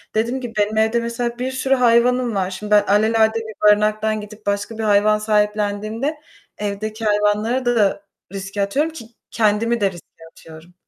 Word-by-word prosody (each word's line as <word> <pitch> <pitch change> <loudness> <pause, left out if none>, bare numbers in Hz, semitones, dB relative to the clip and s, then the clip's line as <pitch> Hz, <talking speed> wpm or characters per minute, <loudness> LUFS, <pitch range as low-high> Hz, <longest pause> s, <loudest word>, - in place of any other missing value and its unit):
Dediğim 235 +4 0
gibi 240 -2 -6
benim 210 +1 0
evde 220 +2 +2
mesela 235 +1 -3
bir 255 +1 -2
sürü 265 +1 +1
hayvanım 245 -1 +2
var. 190 -1 -1
Şimdi 210 +3 -7
ben 210 0 +6
alelade 220 +2 +3
bir 220 -2 -8
barınaktan 215 +1 +1
gidip 210 +1 -12
başka 205 +2 -2
bir 225 - -3
hayvan 210 0 +3
sahiplendiğimde 210 +5 -1 0.4
evdeki 215 +2 -4
hayvanları 210 +4 +1
da 210 -4 +1 0.3
riske 195 +1 -4
atıyorum 285 +11 0
ki 235 -8 -9 0.3
kendimi 230 +1 +1
de 195 -2 +2
riske 175 -2 -15
atıyorum. 160 +2 -15
215 Hz, 160 wpm, -20 LUFS, 205-235 Hz, 0.4 s, ben